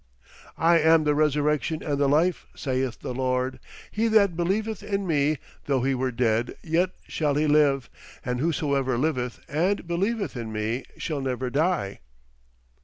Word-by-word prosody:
"I 165 0 +4
am 160 0 +5
the 150 -1 +2
resurrection 150 +1 +1
and 145 -2 -1
the 140 -1 +3
life, 165 +5 +2
saith 130 -2 -2
the - - -4
Lord; 130 0 -1 0.3
he 225 +2 +1
that 205 -5 +4
believeth 200 +5 -1
in 200 -1 -2
me, 150 -2 +2 0.3
though 135 -3 +1
he 135 +1 +2
were 130 0 -1
dead, 115 -1 0
yet 170 +3 +1 0.2
shall 150 -3 0
he 150 +1 +2
live: 145 -4 +3 0.4
and 125 0 -1
whosoever 140 -4 0
liveth 125 -3 -1
and 180 +6 0
believeth 195 - -1
in 115 -2 -5
me 110 +4 -2
shall 150 -4 -3
never 130 -1 -2
die." 150 - 0
145 Hz, 155 wpm, -25 LUFS, 130-170 Hz, 0.4 s, am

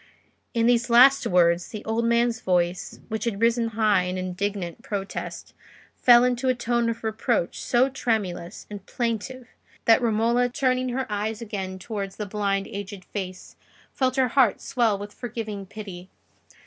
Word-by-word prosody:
In 230 0 +2
these 240 0 +3
last 260 +4 +6
words 175 -1 +3
the 215 -2 -8
old 225 +1 0
man's 235 0 +2
voice, 180 -1 -1
which 220 +1 -3
had 215 -4 -2
risen 230 0 +2
high 215 -4 +2
in 180 +1 -3
indignant 185 +1 -3
protest, 205 -6 -5 0.4
fell 240 -1 +6
into 250 +1 0
a 255 - +2
tone 235 -1 0
of 230 0 -4
reproach 220 -3 -1
so 245 +2 +3
tremulous 210 -9 -3
and 205 -2 -8
plaintive 240 +1 -3 0.4
that 225 +2 +5
Romola, 235 +2 +2
turning 255 0 0
her 260 +2 -2
eyes 210 +1 -3
again 195 -4 -5
towards 195 -1 -5
the 210 - -4
blind 200 -1 -1
aged 200 -2 -7
face, 185 -2 -7 0.4
felt 255 -1 0
her 260 -2 +2
heart 245 -4 +3
swell 230 -5 +1
with 205 +1 -8
forgiving 215 -5 -6
pity. 190 -3 -9
220 Hz, 155 wpm, -25 LUFS, 195-240 Hz, 0.4 s, last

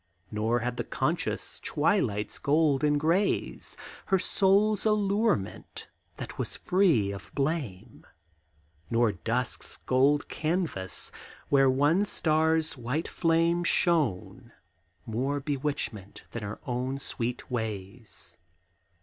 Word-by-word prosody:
Nor 110 +3 +1
had 120 +1 -2
the - - -1
conscious - - -2
twilight's 105 0 0
golds 145 -1 +2
and 150 -1 +3
grays 170 +7 0 0.3
Her 190 - +4
soul's 200 +3 +3
allurement, 210 - 0 0.3
that - - -7
was - - -3
free 165 - +3
of 100 - -9
blame, 135 - -3 0.8
Nor 115 -1 +3
dusk's 115 +6 -2
gold 140 +3 +2
canvas, 155 - -2 0.4
where 135 -1 +5
one 145 +9 +3
star's 160 -2 +1
white 125 +8 -2
flame 170 +1 +2
Shone, 155 - 0 0.5
more 130 +6 -1
bewitchment 140 -8 -3
than 115 - -5
her 100 0 -5
own 125 +2 -2
sweet 125 -2 -4
ways. 110 -3 -5
140 Hz, 105 wpm, -28 LUFS, 115-165 Hz, 0.8 s, where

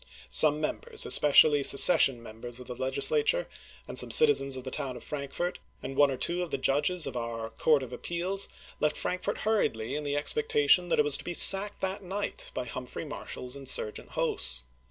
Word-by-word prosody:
Some 150 - +4
members, 445 - -4
especially 145 0 +4
secession 135 -4 +6
members 120 +2 -7
of 125 - -11
the 125 - -7
Legislature, 450 - 0 0.4
and - - +1
some - - +3
citizens 135 - +5
of 130 - -8
the 130 - -8
town 130 -2 -6
of - - -13
Frankfort, 150 +5 -6 0.2
and 135 - -7
one 145 0 +3
or 135 - -5
two 175 +4 -2
judges 150 +6 0
of - - -6
our 115 -1 -6
Court 145 +4 0
of 125 -1 -10
Appeals, 180 +8 -1 0.3
left 150 0 -1
Frankfort 185 +3 -3
hurriedly 135 - -2
in 150 - -5
the 145 0 -4
expec 440 - -2
tation 430 - +2
that - - 0
it 150 - +2
was 145 -1 +5
to - - -11
be 175 - -6
sacked 195 +4 +4
that 190 +1 -4
night 195 +2 -5
by 125 - -4
Humphrey 125 +5 -8
Marshall's 125 -3 -6
insm^gent 135 -6 -2
hosts. 65 0 -3
145 Hz, 185 wpm, -27 LUFS, 130-180 Hz, 0.4 s, secession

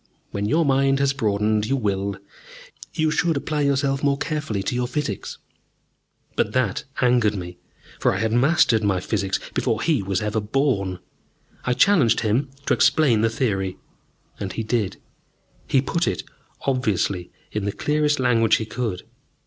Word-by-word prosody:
When 100 0 -2
your 160 +7 +2
mind 135 0 +3
has 140 0 +2
broadened, 105 -3 +1
you 135 - +1
will. 100 -4 -1 0.7
You 155 -2 0
should 165 -1 +1
apply 150 +1 -2
yourself 140 0 +1
more 140 -1 +2
carefully 150 -11 -2
to 95 - -2
your 125 0 0
Physics." 125 -6 -3 1.0
But 105 - 0
that 125 -7 0 0.2
angered 120 -4 +3
me, 90 -2 -7 0.4
for - - +3
I 95 - -1
had 110 +2 0
mastered 120 -4 +4
my 100 -3 +2
Physics 95 0 -1
before 110 - 0
he 155 -9 +2
was 95 -1 -1
ever 105 0 -1
born. 105 -5 0 0.7
I 125 - +2
challenged 145 - +4
him 120 +6 +1 0.2
to - - +2
explain 135 -9 +4
the 115 - +3
theory. 95 -5 -1 0.6
And 95 -2 -4
he 115 - -3
did! 110 -3 -1 0.7
He 135 -1 +3
put 170 +5 0
it, 90 - -1 0.4
obviously, 105 -8 -1 0.2
in 105 -2 -2
the 100 - 0
clearest 150 +4 +1
language 115 -3 +4
he 110 - -2
could. 110 -5 -3
115 Hz, 155 wpm, -23 LUFS, 100-140 Hz, 1.0 s, mastered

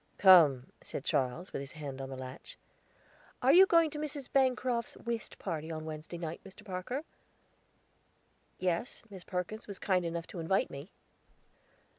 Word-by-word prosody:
"Come," 155 -10 +7
said 135 - -6
Charles, 135 +9 -1
with - - -2
his 135 0 -7
hand 140 -4 -6
on 135 - -5
the 135 - -6
latch. 130 0 -9 0.8
"Are 260 - +5
you 380 +3 +9
going 335 -3 +4
to 300 - -5
Mrs. 295 -3 -5
Bancroft's 255 -3 +1
whist 235 -1 -4
party 165 -3 -4
on 155 -1 -5
Wednesday 155 +2 -6
night, 165 -1 -5
Mr. 195 -1 -14
Parker?" 195 +9 -4 1.5
"Yes; 180 +4 -2
Miss 190 -2 -9
Perkins 185 +6 -4
was 200 -2 -6
kind 185 -2 +1
enough 170 0 -3
to 180 - -8
invite 170 +4 +1
me." 140 +6 -8
180 Hz, 155 wpm, -32 LUFS, 155-235 Hz, 1.5 s, you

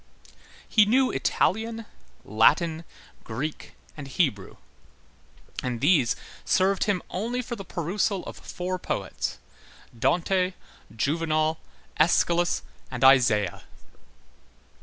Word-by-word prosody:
He 215 -2 +5
knew 255 +4 +3
Italian, 225 +2 0 0.4
Latin, 160 - +3 0.4
Greek, 135 +8 -5 0.2
and 145 -3 -8
Hebrew; 130 - -1 1.1
and 125 -2 -3
these 145 -3 +3 0.3
served 190 0 +2
him 195 -4 0
only 235 +6 -2
for 240 0 -5
the 200 - -8
perusal 190 +2 -2
of - - -7
four 185 +1 -5
poets: - - -3 0.6
Dante, 180 +5 +1 0.4
Juvenal, 155 +4 0 0.4
Æschylus, 170 +2 +3 0.3
and 125 0 -4
Isaiah. 120 -8 +4
170 Hz, 95 wpm, -26 LUFS, 135-195 Hz, 1.1 s, He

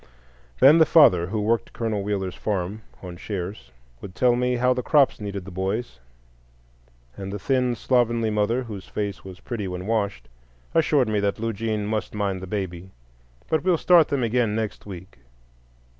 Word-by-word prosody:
Then 145 +5 +7
the 160 - +7
father, 115 - +6
who 105 +3 -2
worked 115 +2 0
Colonel 110 -3 -2
Wheeler's 100 -2 -2
farm 100 +1 -3 0.2
on 90 -1 -8
shares, 90 - -6 0.3
would 95 -2 -9
tell 125 -1 +3
me 125 0 0
how 125 +1 +2
the 125 - -2
crops 140 -4 +3
needed 100 -3 -5
the 100 - -9
boys; 95 - -3 1.2
and 95 -1 -6
the 105 - -4
thin, 125 +3 0
slovenly 115 -2 +1
mother, 105 +4 0
whose 105 -5 -8
face 100 -1 -4
was 95 -1 -10
pretty 110 -5 -4
when 90 0 -5
washed, 100 - -2 0.5
assured 145 -5 +3
me 105 -1 0
that 100 0 0
Lugene 110 -1 -2
must 110 0 -3
mind 100 -3 -2
the 95 - -7
baby. 95 -2 -4 0.6
"But 160 - 0
we'll 180 -2 +3
start 170 -1 +5
them 140 -3 -1
again 115 -2 +1
next 110 -2 -4
week." 95 -6 -10
105 Hz, 170 wpm, -24 LUFS, 95-120 Hz, 1.2 s, Then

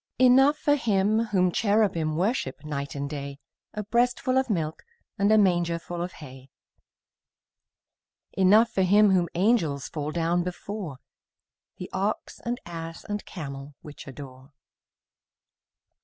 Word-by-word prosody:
Enough 265 +4 +5
for 290 -1 +2
Him 215 -3 +1
whom 185 -4 +2
cherubim 190 -7 +1
Worship 175 - -1
night 140 -2 -4
and 140 0 -3
day, 140 -1 -6 0.4
A 210 - -3
breastful 245 +4 +1
of 265 - -2
milk 160 -6 -2 0.4
And 200 +1 +3
a 220 - +6
mangerful 175 -3 +1
of 175 0 -4
hay; 135 -3 -12 1.8
Enough 210 +5 +5
for 190 - 0
Him 205 +2 +5
whom 180 -2 +2
angels 170 - +1
Fall 150 -1 -4
down 170 +1 +1
before, 180 -3 -6 0.8
The 180 - -6
ox 200 +3 -2
and 240 +1 -3
ass 165 -1 -7
and 205 0 -4
camel 140 -4 -8
Which 150 -1 -11
adore. 135 0 -11
180 Hz, 125 wpm, -26 LUFS, 150-210 Hz, 1.8 s, a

